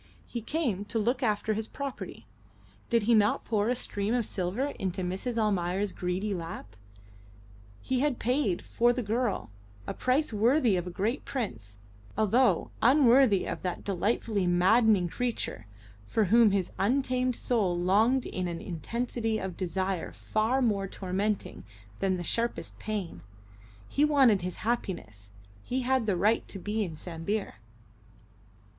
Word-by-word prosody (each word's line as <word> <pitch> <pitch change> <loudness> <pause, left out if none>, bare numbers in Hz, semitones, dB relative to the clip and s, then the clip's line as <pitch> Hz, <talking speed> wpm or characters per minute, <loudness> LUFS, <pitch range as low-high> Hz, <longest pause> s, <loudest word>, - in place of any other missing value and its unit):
He 235 - -5
came 230 - -1
to 225 - -3
look 240 +4 +1
after 215 -2 +1
his 220 +1 -3
property. 230 - -6 0.6
Did 230 -2 +3
he 235 +3 +3
not 210 -2 +3
pour 215 -1 +1
a 250 - +2
stream 210 -1 -2
of 240 -3 0
silver 200 +11 -2
into 185 0 -2
Mrs. 195 +7 -3
Almayer's 195 -2 0
greedy 185 +4 -2
lap? 165 - -7 1.1
He 260 -1 -1
had 280 -2 +1
paid, 245 -7 0
for 240 +1 +2
the 250 0 -2
girl, 225 - -1 0.3
a - - -4
price 255 +1 +1
worthy 230 +1 +3
of 180 0 -2
a - - -3
great 210 +9 -2
prince, 110 - -5 0.4
although 220 -2 +3
unworthy 255 -4 +5
of - - -4
that 180 -2 -3
delightfully 200 0 0
maddening 190 +2 +4
creature 225 - -3 0.4
for 220 - +2
whom 225 +3 +6
his 195 -3 0
untamed 255 +3 +1
soul 205 -9 +1
longed 215 +9 +3
in 185 -1 -3
an 170 -1 -4
intensity 225 +5 -2
of 190 -4 -4
desire 185 0 -2
far 230 +5 0
more 200 -4 +1
tormenting 195 +2 -3 0.4
than 190 -1 +1
the 175 - -4
sharpest 235 +7 -2
pain. 210 -5 -4 0.7
He 290 - +1
wanted 270 -10 +5
his 180 0 -4
happiness. 170 - -3 0.3
He 255 - -2
had 255 -2 +1
the 195 -4 +1
right 210 +6 +2
to - - -6
be 210 +3 -2
in 170 -5 -5
Sambir. 175 +6 -4
210 Hz, 145 wpm, -29 LUFS, 185-240 Hz, 1.1 s, whom